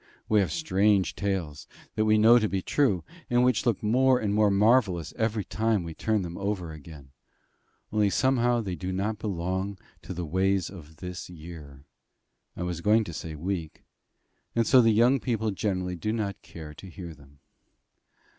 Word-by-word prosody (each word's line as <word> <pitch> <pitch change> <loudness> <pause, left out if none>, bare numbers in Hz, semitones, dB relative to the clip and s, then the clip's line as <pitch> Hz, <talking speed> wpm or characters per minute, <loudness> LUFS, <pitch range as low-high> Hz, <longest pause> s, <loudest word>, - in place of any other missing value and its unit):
We 110 - +4
have 95 - +1
strange 100 - +2
tales, 95 -7 -3 0.3
that 110 - +1
we 110 0 +4
know 115 +3 +7
to 110 -2 0
be 95 -2 -2
true, 105 - +1 0.3
and 120 0 +3
which 125 -1 +2
look 115 -4 0
more 125 +4 +4
and 105 -2 -1
more 105 0 +4
marvellous 100 - +2
every 110 -2 0
time 110 -1 0
we 85 -1 -6
turn 110 +3 0
them 85 +1 -6
over 100 -4 -2
again; 75 -3 -12 0.8
only 105 -2 +3
somehow 120 +1 +2
they 95 -4 -4
do 90 +1 -4
not 100 +3 -2
belong 95 0 -3 0.2
to - - -7
the 85 0 -3
ways 95 +3 0
of 80 -5 -12
this 90 +1 -7
year 75 -5 -11 0.7
I 90 - -3
was 90 -2 -3
going 110 +4 +4
to 85 - -7
say 80 0 -6
week, 85 0 -4 0.7
and 115 0 +2
so 130 - +6
the 115 - +4
young 120 +5 +4
people 110 -4 -1
generally 90 -2 -2
do 105 +5 -2
not 105 -3 -3
care 80 -3 -10
to 95 +5 -11
hear 85 -1 -8
them. 70 -1 -19
100 Hz, 175 wpm, -27 LUFS, 85-110 Hz, 0.8 s, know